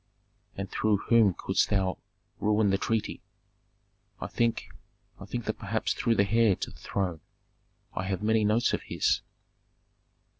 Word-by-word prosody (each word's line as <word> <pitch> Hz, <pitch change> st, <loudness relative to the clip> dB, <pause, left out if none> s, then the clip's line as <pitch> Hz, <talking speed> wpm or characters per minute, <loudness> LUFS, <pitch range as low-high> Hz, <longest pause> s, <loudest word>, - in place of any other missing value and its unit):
"And 100 Hz, 0 st, -3 dB
through 110 Hz, -2 st, +2 dB
whom 105 Hz, -3 st, +3 dB
couldst -, -, +1 dB
thou 95 Hz, -2 st, 0 dB, 0.4 s
ruin 105 Hz, -1 st, +2 dB
the 95 Hz, -, +1 dB
treaty?" 110 Hz, +1 st, -1 dB, 1.0 s
"I -, -, -4 dB
think 115 Hz, -1 st, -1 dB, 0.5 s
I 100 Hz, -, -8 dB
think 120 Hz, +3 st, -4 dB
that 110 Hz, -, -3 dB
perhaps 110 Hz, +1 st, -1 dB
through 115 Hz, -1 st, +1 dB
the 100 Hz, -1 st, +3 dB
heir 110 Hz, -1 st, +4 dB
to -, -, -5 dB
the -, -, -16 dB
throne. 90 Hz, -5 st, -3 dB, 0.7 s
I 95 Hz, -, -3 dB
have 95 Hz, +1 st, -2 dB
many 110 Hz, 0 st, +3 dB
notes 110 Hz, +3 st, +2 dB
of -, -, 0 dB
his." -, -, 0 dB
105 Hz, 150 wpm, -28 LUFS, 100-110 Hz, 1.0 s, heir